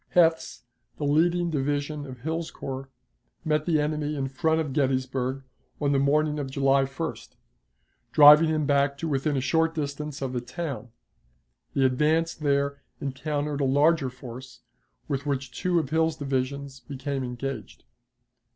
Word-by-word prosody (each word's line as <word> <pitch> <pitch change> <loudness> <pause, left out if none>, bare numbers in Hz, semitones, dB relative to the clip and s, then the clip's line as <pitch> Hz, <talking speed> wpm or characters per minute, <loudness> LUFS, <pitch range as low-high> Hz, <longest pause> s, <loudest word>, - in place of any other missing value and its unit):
Heth's, 165 -6 +3 0.3
the - - -5
leading 170 +4 +2
division 145 0 -2
of 130 -2 -10
Hill's 160 +3 -2
corps, 135 0 -6 0.6
met 155 0 +1
the 160 -3 +3
enemy 150 0 -1
in 135 -2 -2
front 160 +4 +1
of 150 -4 -2
Gettysburg 130 -1 0 0.4
on 145 -1 +1
the 140 - +3
morning 150 +2 +2
of 140 -2 -3
July 135 0 +3
1st, 140 +5 -6 0.8
driving 150 +2 +8
him 155 -1 +1
back 140 -1 +2
to 165 - -3
within 140 0 0
a - - 0
short 160 +3 +1
distance 145 -1 -4
of 130 -1 -3
the 125 - -1
town; 125 -2 -5 0.9
the 135 - +3
advance 155 +6 +2
there 140 -1 0 0.2
encountered 145 +1 -2
a - - +2
larger 145 +1 +3
force, 125 0 -10 0.5
with 140 +1 -3
which 135 -2 -2
two 180 -1 0
of 155 -4 -1
Hill's 160 0 +2
divisions 135 0 -3
became 135 0 -4
engaged. 125 -2 -6
140 Hz, 150 wpm, -26 LUFS, 135-155 Hz, 0.9 s, driving